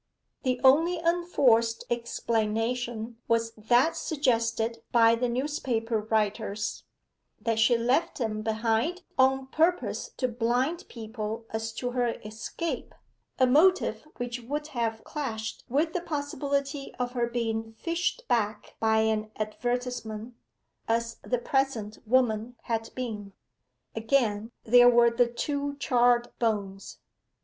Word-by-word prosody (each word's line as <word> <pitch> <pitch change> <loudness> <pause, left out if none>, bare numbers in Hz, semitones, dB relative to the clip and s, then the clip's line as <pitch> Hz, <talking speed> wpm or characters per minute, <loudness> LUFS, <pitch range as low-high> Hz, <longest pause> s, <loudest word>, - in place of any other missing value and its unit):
The 255 -1 0
only 320 +7 +5
unforced 285 -10 +2
explanation 230 0 -1
was 230 0 +1
that 240 +9 +3
suggested 230 -7 0
by 230 -1 +6
the 240 +1 0
newspaper 240 -4 -1
writers 215 0 -1 0.5
that 225 0 0
she 235 +2 +5
left 260 +9 +1
them 220 -5 -2
behind 225 - 0 0.2
on 265 0 +4
purpose 335 - 0
to 255 - +1
blind 245 +8 0
people 220 -1 -5
as 225 0 -3
to 245 +2 -3
her 245 -2 0
escape, 225 +10 -5 0.4
a 260 - +5
motive 310 +4 +3
which 245 0 -3
would 295 +5 -4
have 225 -4 -2
clashed 230 -8 -5
with 310 +6 +1
the 360 - -1
possibility 285 -2 -3
of 245 -1 -2
her 240 -1 0
being 225 -2 -2
fished 350 - -2
back 215 -2 -1
by 220 0 +3
an 220 -1 0
advertisement, 240 0 -3 0.5
as 230 0 0
the 250 - -1
present 240 -4 -1
woman 240 -1 +2
had 225 -2 -2
been. 215 -6 -5 0.6
Again, 225 -2 +1
there 245 +2 +7
were 235 -1 +5
the 240 +1 +3
two 285 +4 -2
charred 240 -2 +3
bones. 200 -4 -2
235 Hz, 120 wpm, -28 LUFS, 225-265 Hz, 0.6 s, there